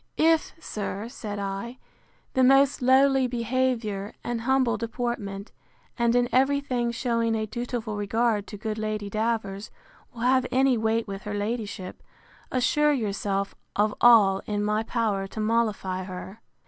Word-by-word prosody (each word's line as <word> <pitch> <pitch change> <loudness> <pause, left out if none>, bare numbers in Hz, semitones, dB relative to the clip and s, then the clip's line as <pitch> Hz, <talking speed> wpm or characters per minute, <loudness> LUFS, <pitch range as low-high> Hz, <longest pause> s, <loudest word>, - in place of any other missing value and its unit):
If, 325 0 +3
sir, 210 -5 -5
said 210 -5 -6
I, 200 +5 -4 0.6
the 260 - +3
most 270 +1 +5
lowly 265 +1 +4
behaviour, 235 -4 -1
and 240 -1 -3
humble 260 -1 +2
deportment, 220 -3 -4 0.4
and 235 -1 +2
in 245 0 +3
every 270 +2 +3
thing 250 -4 -1
shewing 230 -1 0
a 220 0 -1
dutiful 235 -1 -4
regard 210 0 0
to 205 - -8
good 215 +1 -4
Lady 215 -1 -3
Davers, 215 -2 -2 0.4
will 235 -3 -10
have 255 +1 +3
any 260 0 +3
weight 225 0 0
with 195 0 -6
her 210 0 -3
ladyship, 205 -3 -4 0.5
assure 295 +4 +3
yourself 200 -4 -2 0.2
of 210 +1 +2
all 205 -5 +6
in 205 -1 -1
my 210 +1 +1
power 220 -4 -1
to 220 - -8
mollify 215 -4 0
her. 190 +3 -8
225 Hz, 145 wpm, -26 LUFS, 205-245 Hz, 0.6 s, all